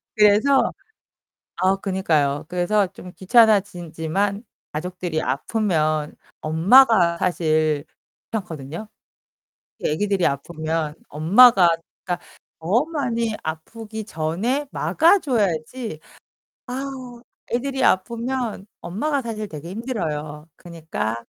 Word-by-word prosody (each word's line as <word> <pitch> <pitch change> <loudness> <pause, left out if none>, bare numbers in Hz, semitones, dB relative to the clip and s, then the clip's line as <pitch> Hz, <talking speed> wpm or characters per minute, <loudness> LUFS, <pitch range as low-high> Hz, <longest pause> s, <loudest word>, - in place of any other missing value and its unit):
그래서 215 +6 +4 0.8
아, 190 +1 +2
그니까요. 160 -7 0
그래서 180 +3 +1
좀 180 0 -12
귀찮아졌지만 195 -2 +2 0.3
가족들이 175 0 -3
아프면 155 -1 0 0.3
엄마가 175 +2 +5
사실 155 -4 +1 0.5
귀찮거든요. 170 -2 -5 0.9
특히 - - -1
아기들이 195 +2 +1
아프면 155 +2 -2
엄마가 175 +2 +6 0.3
그니까 180 -1 -3 0.4
더 205 - +2
많이 235 -8 -1
아프기 220 +7 -6
전에 205 - -2
막아 340 +5 +3
줘야지. 215 - -2 0.7
아우, 255 -2 -6 0.3
애들이 265 +2 -1
아프면 235 +1 0 0.2
엄마가 275 - -1
사실 220 -3 -5
되게 160 +1 -8
힘들어요. 160 - -4
그니까 160 -10 -4
190 Hz, 240 characters per minute, -22 LUFS, 160-230 Hz, 0.9 s, 엄마가